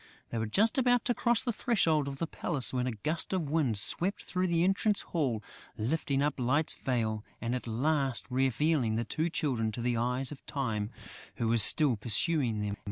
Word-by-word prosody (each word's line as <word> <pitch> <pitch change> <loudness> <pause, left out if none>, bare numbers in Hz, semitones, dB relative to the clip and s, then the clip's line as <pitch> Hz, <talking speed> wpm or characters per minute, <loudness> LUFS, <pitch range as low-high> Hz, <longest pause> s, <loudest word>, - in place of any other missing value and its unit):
They 115 - -2
were 110 - -1
just 220 - +2
about 245 -2 +3
to 245 - +2
cross 240 +1 +2
the 240 -2 -1
threshold 165 - +1
of 135 -1 -5
the 165 - -1
palace, 140 -5 -2
when 125 0 0
a - - -1
gust 150 - -2
of 165 -7 -1
wind 140 -9 +1
swept 175 - 0
through 185 0 -1
the 170 -1 +2
entrance 195 +2 +2
hall, 130 -10 -2 0.3
lifting 135 +4 0
up 150 -1 -1
Light's 130 +5 +1
veil 110 -4 -2 0.2
and 120 +1 -2
at 125 -1 -3
last 135 +2 0
revealing 130 -1 +1
the 115 +1 -1
two 160 +8 -1
Children 125 -9 -1
to 120 - -4
the 120 0 0
eyes 125 +3 -1
of 145 - -10
Time, 110 -7 -2 0.5
who 115 - -1
was 115 0 +4
still 135 +2 +5
pursuing 115 +1 +1
them. 105 0 -3
135 Hz, 195 wpm, -30 LUFS, 115-165 Hz, 0.5 s, still